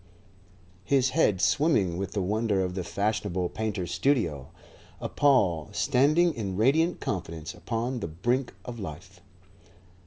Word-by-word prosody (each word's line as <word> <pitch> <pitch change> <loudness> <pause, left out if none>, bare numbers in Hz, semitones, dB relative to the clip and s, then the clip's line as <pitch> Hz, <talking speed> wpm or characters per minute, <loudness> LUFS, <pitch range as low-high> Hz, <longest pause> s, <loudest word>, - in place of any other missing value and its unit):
his 135 +1 +2
head 115 - +2
swimming 95 - +2
with 95 +1 -4
the 100 -3 -1
wonder 105 0 +1
of 90 -1 -3
the 95 -1 -3
fashionable 100 -3 -1
painter's 105 -6 -3
studio; 90 - 0 0.5
a - - -3
Paul 100 - +2
standing 150 +6 +3
in 100 -5 -4
radiant 155 - +3
confidence 85 -3 -4
upon 120 +3 -3
the 100 - -4
brink 120 - -1
of 120 -2 -7
life. 90 +1 -9
105 Hz, 130 wpm, -27 LUFS, 90-130 Hz, 0.5 s, standing